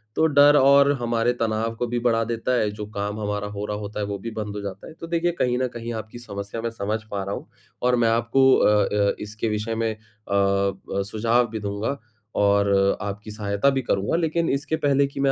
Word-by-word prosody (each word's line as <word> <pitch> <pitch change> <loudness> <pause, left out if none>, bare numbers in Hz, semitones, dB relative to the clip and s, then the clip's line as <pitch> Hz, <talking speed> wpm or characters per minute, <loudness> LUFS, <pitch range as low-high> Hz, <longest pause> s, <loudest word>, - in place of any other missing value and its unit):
तो 160 - +3
डर 145 0 +6
और 140 +1 +6
हमारे 120 0 +1
तनाव 115 0 -1
को 120 +1 -2
भी 120 +1 -1
बढ़ा 115 -1 +2
देता 115 +2 -2
है, 105 - +1
जो 105 0 -6
काम 105 +1 -3
हमारा 105 0 -2
हो 105 0 -5
रहा 105 0 -3
होता 105 0 -6
है, 105 - -1
वो 100 0 -4
भी 115 +3 -6
बंद 105 -2 -5
हो 105 - -4
जाता 100 -1 -7
है। 160 - -11
तो 165 - -7
देखिए, 170 +1 +1
कहीं 125 -7 0
न 130 - +1
कहीं 120 0 -5
आपकी 110 +2 -7
समस्या 100 -1 -6
मैं 115 - -2
समझ 110 0 -2
पा 100 -1 -2
रहा 100 +1 -3
हूँ - - -9 0.3
और 125 0 +3
मैं 115 -1 +3
आपको 120 +4 +4
अ 105 0 +4 0.3
अ, - - -1
इसके 105 +2 -4
विषय 105 +2 -2
में 115 0 0
अ, - - -26 0.3
ब 100 0 0
सुझाव 115 +2 +2
भी 110 -1 -4
दूँगा 100 +6 -3 0.4
और 100 0 +3 0.3
अ, - - -3
आपकी 105 +1 -6
सहायता 105 +4 +1
भी 135 -1 0
करूँगा। 100 +3 0
लेकिन 165 0 0
इसके 145 +3 -1
पहले 140 -2 +2
कि 140 - -9
मैं 135 0 +3
115 Hz, 230 wpm, -24 LUFS, 105-125 Hz, 0.4 s, डर